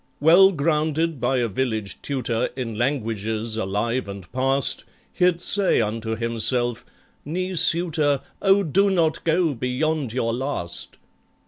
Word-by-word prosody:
Well 175 +6 +6
grounded 155 -1 0
by 135 - +1
a 120 -1 +1
village 110 -4 -3
tutor 125 -4 -2
In 125 -4 -4
languages 110 -3 -2
alive 110 +3 -2
and 100 -2 -9
past, 135 +1 +1 0.3
He'd 180 -1 +2
say 195 +2 +2
unto 110 0 -2
himself, 115 +1 0 0.4
"Knee 185 +5 -3
suitor, 160 -5 +2 0.2
Oh, 195 0 +4
do 195 +5 +2
not 165 -4 +1
go 165 -1 +2
beyond 130 +2 -1
your 115 -1 -1
last!" 120 -9 -4
130 Hz, 125 wpm, -23 LUFS, 115-160 Hz, 0.4 s, Well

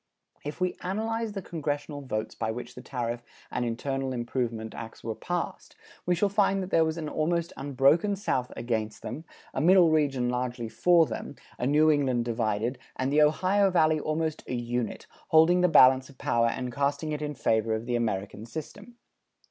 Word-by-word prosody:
If 150 +3 -6
we 180 0 0
analyse 220 +3 -2
the 195 -2 -5
congressional 145 -3 -4
votes 110 -5 -3
by 110 - -3
which 120 +2 -5
the 125 - -10
tariff 120 -3 -3 0.3
and - - -1
internal 130 +3 -2
improvement 120 -2 -3
acts 115 -1 -9
were 115 - -2
passed, 175 +8 -4 0.3
we 180 - +3
shall 205 +4 +2
find 195 -1 +2
that 185 - -7
there 165 - +5
was 160 0 -1
an 160 -2 -4
almost 170 +2 -1
unbroken 145 +8 +2
South 130 -11 -1
against 110 -3 -3
them, 150 +7 -6 0.3
a - - -1
Middle 175 0 +6
Region 140 -5 +2
largely 125 -1 -2
for 170 +5 +4
them, 110 -6 -6 0.2
a 125 - 0
New 155 +2 +5
England 130 -5 +1
divided, 115 +1 -1 0.2
and 130 +2 -1
the 150 - +5
Ohio 185 +6 +3
Valley 155 -3 +3
almost 155 +1 -2
a 125 - -2
unit, 120 -1 -3 0.2
holding 165 +3 +5
the 180 - +5
balance 130 -3 +6
of 135 - -16
power 115 -2 +2
and 125 +1 -3
casting 145 +3 -1
it 150 0 -3
in 150 -1 -3
favor 110 -3 +1
of 110 +1 -5
the 120 0 -1
American 105 -1 -2
system. 205 - -8
140 Hz, 180 wpm, -28 LUFS, 120-165 Hz, 0.3 s, Middle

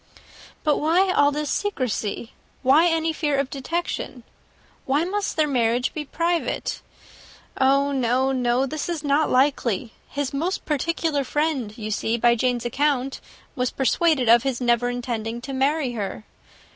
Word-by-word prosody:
"But 300 -2 +2
why 355 +5 +3
all 285 -3 +4
this 295 0 -2
secrecy? 250 - -2 0.3
Why 290 +6 +5
any 325 -1 +1
fear 295 -3 0
of 275 -1 -1
detection? 275 -3 -4 0.6
Why 280 +4 +2
must 400 +3 -2
their 310 -1 +3
marriage 245 -2 +1
be 300 -1 -4
private? 335 +4 -1 0.7
Oh, 275 +1 +3
no, 260 0 +1
no 250 0 +1
this 310 +5 -4
is 330 -3 -3
not 290 +2 +2
likely. 255 -5 +1 0.2
His 285 -2 -3
most 335 +7 -2
particular 305 0 0
friend, 270 -7 -1
you 215 -1 -5
see 225 +2 0
by 235 +1 +4
Jane's 245 0 0
account, 270 +1 0 0.3
was 250 -2 0
persuaded 275 -1 +1
of 235 +1 +7
his 265 -1 -2
never 240 -1 +2
intending 235 -2 -3
to 270 +2 -6
marry 275 +1 +1
her. 210 -2 -5
270 Hz, 145 wpm, -23 LUFS, 245-305 Hz, 0.7 s, of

